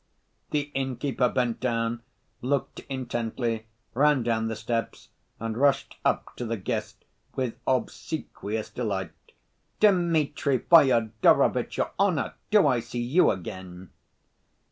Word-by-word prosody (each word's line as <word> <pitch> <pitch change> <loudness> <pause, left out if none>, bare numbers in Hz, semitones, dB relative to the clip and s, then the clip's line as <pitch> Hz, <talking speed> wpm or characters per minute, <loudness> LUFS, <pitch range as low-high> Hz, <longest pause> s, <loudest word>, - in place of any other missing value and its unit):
The 145 -1 -1
innkeeper 130 -1 0
bent 120 -2 0
down, 115 -1 -1 0.4
looked 135 +2 -1
intently, 120 -3 -3 0.3
ran 140 0 +3
down 115 -1 0
the 115 - -3
steps, 115 +1 -3 0.3
and 115 0 -3
rushed 140 +3 +2
up - - 0
to 120 - -3
the 115 0 -2
guest 105 +2 -4 0.3
with 130 -4 -1
obsequious 115 -4 -3
delight. 100 -8 -3 0.7
"Dmitri 165 -8 +3
Fyodorovitch, 120 -8 +4
your - - 0
honor! - - +1 0.2
Do 210 -5 +5
I 130 -4 +3
see 120 +1 -4
you 140 +10 +4
again?" 90 0 -6
120 Hz, 115 wpm, -27 LUFS, 110-140 Hz, 0.7 s, Do